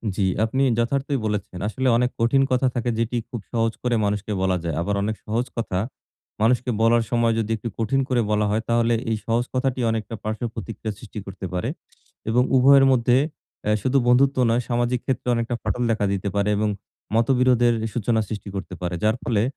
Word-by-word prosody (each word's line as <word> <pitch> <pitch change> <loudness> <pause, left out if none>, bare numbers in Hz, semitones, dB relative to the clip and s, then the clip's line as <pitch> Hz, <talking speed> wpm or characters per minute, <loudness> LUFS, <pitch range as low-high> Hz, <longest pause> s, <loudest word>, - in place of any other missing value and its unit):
জি, - - -2 0.2
আপনি 130 +5 0
যথার্থই 140 +4 0
বলেছেন। 100 -4 -3
আসলে 130 +5 -1
অনেক 125 +1 +2
কঠিন 115 +4 +3
কথা 130 +1 +3
থাকে 120 0 -1
যেটি 115 +1 0
খুব 120 - -5
সহজ 115 -1 +1
করে 125 -1 +1
মানুষকে 105 +1 -2
বলা 95 -1 +2
যায়। 85 -2 -2
আবার 100 +4 -1
অনেক 110 +1 -1
সহজ 115 +3 -1
কথা, 105 -5 -1 0.6
মানুষকে 125 +3 +2
বলার 115 +1 +4
সময় 115 -1 +2
যদি 110 0 -2
একটু 115 - -5
কঠিন 120 +5 +1
করে 125 -2 +2
বলা 105 0 +2
হয় 110 +2 +1
তাহলে 115 0 +3 0.2
এই 110 - 0
সহজ 115 +1 +1
কথাটি 130 0 0
অনেকটা 110 0 -3
পার্শ্বপ্রতিক্রিয়া 110 -1 -4
সৃষ্টি 110 -1 -8
করতে 95 -1 -7
পারে 90 - -1 0.6
এবং 125 +2 +4
উভয়ের 135 +1 +7
মধ্যে 120 -1 +3 0.5
অ্যা 105 - +2
শুধু 135 +1 +2
বন্ধুত্ব 135 +3 +4
নয় 115 +1 +2
সামাজিক 120 0 0
ক্ষেত্রে 130 -2 -2
অনেকটা 115 +1 -1
ফাটল 125 - -1
দেখা 110 -2 +1
দিতে 100 0 -2
পারে 100 0 +1
এবং 105 +1 +1 0.5
মতবিরোধের 120 0 +3 0.2
সূচনা 115 -1 +1
সৃষ্টি 105 -1 -6
করতে 95 -1 -5
পারে। 90 0 -3
যার 110 +2 +2
ফলে 110 -4 +1
115 Hz, 185 wpm, -23 LUFS, 105-125 Hz, 0.6 s, উভয়ের